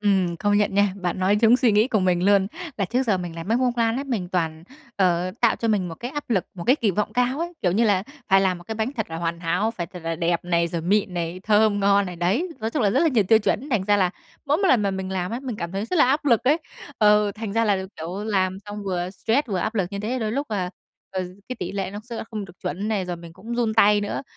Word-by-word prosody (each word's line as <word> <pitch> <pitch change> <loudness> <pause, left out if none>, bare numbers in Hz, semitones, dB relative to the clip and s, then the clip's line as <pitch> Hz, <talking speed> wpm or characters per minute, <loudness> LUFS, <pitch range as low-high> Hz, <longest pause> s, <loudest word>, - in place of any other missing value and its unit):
Ừm, 190 -4 +1
công 205 +3 +1
nhận 205 -1 +1
nha. 200 -1 +3
Bạn 180 -1 -3
nói 190 +2 +3
trúng 230 +2 +6
suy 250 -4 +3
nghĩ 215 +4 +4
của 215 -5 +1
mình 180 -1 +2
luôn. 200 -1 +4 0.3
Là 200 - 0
trước 240 +7 0
giờ 215 -7 +1
mình 175 -2 -5
làm 165 +2 -7
bánh 230 +2 +2
bông 250 -1 +2
lan 230 0 +1
ấy, 275 - -3
mình 220 -10 -3
toàn, 165 -3 -2 0.3
ờ, 180 -1 +2
tạo 235 -2 +3
cho 230 - -2
mình 200 -5 +1
một 165 - -6
cái 240 +9 -6
áp 295 -2 -6
lực, 195 -6 +1
một 175 -2 -7
cái 255 +4 +5
kỳ 225 -8 +1
vọng 210 +3 -1
cao 250 +4 +1
ấy. 345 +1 -3
Kiểu 180 - +2
như 225 +5 +3
là 200 -4 +3 0.3
phải 195 0 +5
làm 185 -2 +1
một 175 - -14
cái 220 - -5
bánh 220 +5 -2
thật 220 -9 -4
là 165 - -4
hoàn 170 0 -3
hảo, 180 +6 0
phải 180 -7 -5
thật 180 +2 -10
là 165 0 -2
đẹp 170 0 0
này, 170 -1 +2
rồi 170 0 -3
mịn 195 +1 +1
này, 170 +1 -3
thơm 210 -1 +3
ngon 200 0 +3
này, 180 - -6
đấy, 195 - 0
nói 220 +1 -2
chung 295 - -1
là 205 - +3
rất - - +2
là 335 - +4
nhiều 235 -8 +2
tiêu 220 - +7
chuẩn. 225 +5 -1
Thành 215 -6 +1
ra 205 +1 +3
là 185 -3 +2 0.4
mỗi 290 +2 +3
một 390 +1 +1
lần 245 -8 +4
mà 200 - +1
mình 190 -1 -4
làm 185 -1 -2
á, 235 +2 -3
mình 245 -5 -4
cảm 170 -2 -5
thấy 195 +2 -2
rất 360 - -2
là - - +7
áp 285 +4 +1
lực 235 -4 +3
ấy. 290 +5 +4 0.4
Ờ, 210 -1 +4
thành 215 -2 -5
ra 225 +2 +2
là, 205 -2 +3 0.2
kiểu, 175 +6 -5
làm 190 -3 0
xong 205 0 -6
vừa 180 -2 -2
stress 225 +9 0
vừa 195 -3 -1
áp 215 +6 -2
lực 190 -5 0
như 200 - -3
thế, 235 +5 -2
đôi 215 -3 -2
lúc, 280 +4 -2
à, 185 -4 -2 0.4
ờ, 190 -1 -2 0.3
cái 255 - -4
tỉ 180 - -4
lệ 195 -2 -3
nó 205 - -6
sẽ 235 -1 -7
là - - -4
không 215 -3 -4
được 185 - -12
chuẩn 200 +4 -3
này, 210 -4 0
rồi 180 -1 -4
mình 170 -1 -11
cũng 215 +7 -7
run 235 -2 0
tay 210 -2 +5
nữa. 205 - -3
205 Hz, 300 wpm, -24 LUFS, 180-225 Hz, 0.4 s, tiêu